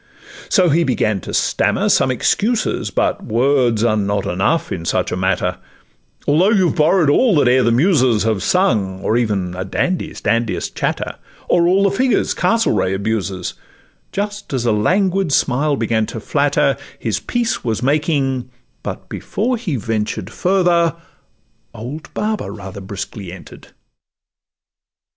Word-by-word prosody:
So 185 -4 +4
he 165 +3 +3
began 110 - 0
to - - -7
stammer - - +1
some - - +3
excuses; 200 - 0
But - - -1
words 120 -1 +2
are 115 -2 +3
not 100 -1 -1
enough 95 - 0
in 85 - -4
such 85 - -1
a - - -1
matter, 90 -1 0 0.7
Although 165 +7 +4
you 190 -6 +3
borrow'd 155 0 +3
all 230 - +4
that 145 -4 +3
e'er 130 +1 +4
the 115 -1 +2
muses 130 - +3
Have 110 -3 0
sung, 105 - +1
or 110 - 0
even 100 -7 0
a 95 - -3
Dandy's 175 - -2
dandiest 115 +1 -1
chatter, - - -2 0.3
Or 170 -1 +3
all 190 +2 +3
the 200 - +3
figures 250 +5 +1
Castlereagh 110 - +1
abuses; 100 -3 -2 0.6
Just 205 0 -4
as 125 -3 -1
a 115 - +3
languid 185 - +1
smile 140 +3 +2
began 110 -3 0
to - - -6
flatter - - +1 0.2
His - - -2
peace 240 -1 -2
was 115 -1 -2
making, 135 -3 0 0.3
but - - -6
before 245 +5 -2
he 210 - -3
ventured 110 -3 -3
Further, 175 -3 +2 0.8
old 130 +8 -7
Baba 210 - -2
rather 100 -1 -8
briskly 95 -1 -7
enter'd. 90 - -12
125 Hz, 145 wpm, -18 LUFS, -, 0.8 s, So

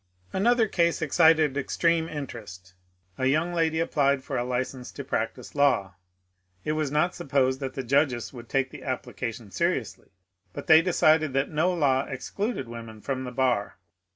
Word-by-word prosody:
Another 230 +3 +3
case 170 -4 +1
excited 160 -2 +4
extreme 165 +3 +1
interest 105 -11 -8 0.5
A 130 - +2
young 155 +6 +1
lady 160 -1 +1
applied 140 -4 +1
for - - -5
a 120 - 0
license 125 +1 -3
to - - -6
practise - - -3
law. 125 -10 +2 0.7
It - - 0
was 155 -2 -1
not 155 +5 +1
supposed 135 -5 0
that 135 -2 -5
the 135 - -3
judges 130 -1 +1
would 120 -2 -11
take 135 -1 0
the - - -10
application 120 -4 -5
seri - - +1
ously, - - -13 0.4
but - - -7
they 160 0 +7
decided 155 -4 +3
that 135 +1 0
no 160 +4 +2
law 140 -6 +2
excluded 195 - -4
women 115 -2 -9
from 130 +3 -3
the 125 - -5
bar. 125 -5 0
140 Hz, 165 wpm, -26 LUFS, 125-160 Hz, 0.7 s, they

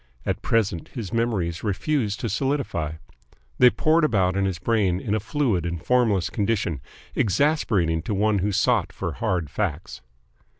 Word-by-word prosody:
At - - -2
present 100 -8 0
his 115 -4 -5
memories 100 -7 -1
refused 105 +1 -1
to 115 - -1
solidify. 115 - -1 0.7
They 125 - +8
poured 160 +5 +2
about 95 -10 +2
in 100 0 +1
his 95 -3 -1
brain 95 -1 +1
in 105 - -2
a 110 - +1
fluid 110 - 0
and 85 0 -3
formless 105 -5 +1
condition, 100 - -1 0.3
exasperating 100 - +1
to 100 +5 -3
one 105 0 +2
who 100 +3 0
sought - - +2
for - - -4
hard 85 -6 -2
facts. 90 - -3
100 Hz, 155 wpm, -24 LUFS, 90-115 Hz, 0.7 s, They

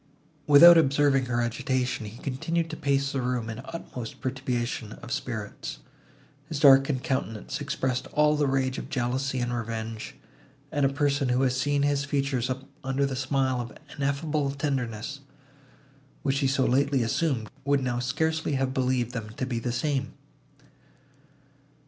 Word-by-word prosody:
Without 165 +4 +10
observing 140 -2 +3
her 120 -1 0
agitation, 125 0 -1
he 110 +3 -10
continued 165 +6 -2
to - - -4
pace 140 -2 0
the 135 - -1
room 125 -2 -1
in 110 - -7
the 130 +5 -9
utmost 125 -9 -7
perturbation 125 -4 -3
of 120 - -10
spirits. 110 - -4 0.7
His 155 - -3
darkened 135 -2 +6
countenance 115 -6 -3
expressed 130 -1 -2
all 150 0 +3
the 145 -1 +1
rage 130 -1 0
of - - -8
jealousy 130 +1 -1
and 120 -1 -1
revenge; 115 -1 -4 0.6
and 145 -1 +2
a - - 0
person, 140 -1 +1
who 125 +2 +2
had 130 - +3
seen 140 +2 +1
his 145 -1 +1
features 140 -3 -1 0.3
under 135 +1 0
the 135 -1 -2
smile 130 -1 0
of 120 +1 -8 0.2
ineffable 145 +1 0
tenderness, 135 -3 -3 1.0
which 135 0 +1
he 140 - +2
so 135 0 +2
lately 135 0 +2
assumed, 115 -1 0 0.2
would 140 -1 +2
now 120 -1 -1
scarcely 160 +5 0
have 135 -1 0
believed 130 -3 0
them 115 -3 -5
to 130 - -1
be 120 -3 -2
the 120 +1 -2
same. 135 +2 -1
130 Hz, 155 wpm, -27 LUFS, 125-140 Hz, 1.0 s, Without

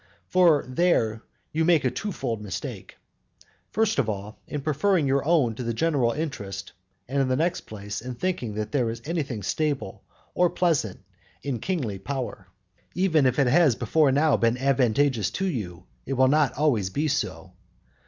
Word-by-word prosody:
And 160 -8 +4
there 115 -11 +2 0.3
you 160 +1 +1
make 165 -4 +3
a 130 - +2
two 210 - -4
fold 115 - -3
mistake: 100 -4 -6 0.7
first 220 -6 +1
of 120 -5 +1
all, 105 +1 -5
in 150 - -4
preferring 155 +4 +1
your 135 0 +2
own 150 -7 +3
to 115 - -7
the 115 -1 -2
general 140 -5 +2
interest; 100 -11 -5 0.4
and 135 +2 0
in 135 - +1
the 130 - +1
next 170 +5 -1
place, 105 -1 -6
in 125 +1 -6
thinking 125 - -2
that 105 0 -3
there 125 -3 +1
is 115 +1 -5
anything 145 -9 -2
either - - -10
stable 150 +5 -2 0.3
or 180 -1 +3
pleasant 160 - 0 0.4
in 135 -5 -2
kingly 130 - -2
power. 115 -3 -5 0.5
Even 160 -6 +3
if 125 - 0
it 140 - +4
has 145 0 +4
before 150 +3 +2
now 145 +2 +3
been 115 +1 +2
advantageous 130 -2 +2
to 190 - -3
you, 105 - -4 0.2
it 135 - -1
will 130 0 +4
not 150 0 +3
always 130 -10 +1
be 145 +11 -1
so. 145 - -3
135 Hz, 175 wpm, -25 LUFS, 115-160 Hz, 0.7 s, And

